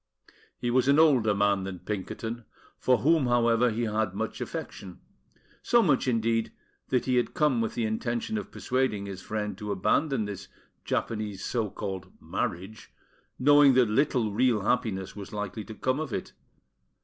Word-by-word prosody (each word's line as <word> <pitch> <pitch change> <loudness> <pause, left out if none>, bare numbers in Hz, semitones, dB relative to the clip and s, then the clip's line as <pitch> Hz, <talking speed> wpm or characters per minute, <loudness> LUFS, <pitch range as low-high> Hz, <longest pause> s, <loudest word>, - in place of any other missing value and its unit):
He 120 - -2
was 130 +1 +2
an 140 +1 +5
older 130 -10 +4
man 100 -1 +2
than 95 -1 -5
Pinkerton, 110 +4 -5 0.3
for 130 -1 +3
whom, 155 -1 +3
however, 120 0 +3
he 115 +2 -2
had 110 -3 -1
much - - -4
affection; 95 -3 -6 0.6
so 235 -1 +4
much, 140 -6 +2
indeed, 115 -1 +1 0.4
that 125 - +1
he 130 -1 +2
had 120 - 0
come 145 -6 +2
with 115 - -2
the 115 - 0
intention 120 - -2
of - - -8
persuading 125 -6 -1
his 100 -2 -7
friend 105 +1 -3
to 105 -1 -4
abandon 120 +5 +1
this 100 -2 -7 0.4
Japanese 105 -4 -2
so 115 -4 -1
called 95 -1 -6
"marriage," 100 +6 -4 0.5
knowing 145 0 +6
that 125 -4 +4
little 120 -4 +1
real 120 -1 +2
happiness 110 -4 -1
was 100 -1 -8
likely 105 +1 -4
to 110 - -9
come 130 +5 0
of 155 -5 -4
it. - - -4
115 Hz, 160 wpm, -28 LUFS, 105-130 Hz, 0.6 s, knowing